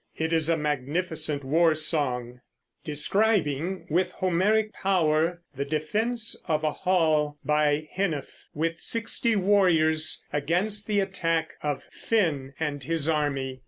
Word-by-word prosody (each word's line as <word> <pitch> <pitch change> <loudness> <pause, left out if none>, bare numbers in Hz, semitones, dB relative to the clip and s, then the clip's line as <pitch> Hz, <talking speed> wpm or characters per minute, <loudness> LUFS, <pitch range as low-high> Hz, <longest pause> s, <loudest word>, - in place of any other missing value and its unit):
It 160 +1 -1
is 160 -1 +3
a 165 - +2
magnificent 150 +1 -2
war 160 +4 +3
song, 125 -6 0 0.4
describing 175 +1 0
with 180 +4 0
Homeric 205 +5 +1
power 170 -2 +1
the 140 - -2
defense 215 +11 -1
of 155 -2 0
a 155 - +1
hall 155 -5 +1
by 150 0 +1
Hnæf 175 -7 -1 0.3
with 165 +1 -2
sixty 230 0 +1
warriors, 165 -6 +3
against 180 +8 0
the 205 -2 +2
attack 165 -4 -1
of 145 -2 -3
Finn 145 -11 -1
and 145 -3 -3
his 160 +1 0
army. 140 -4 -1
160 Hz, 125 wpm, -26 LUFS, 150-185 Hz, 0.4 s, is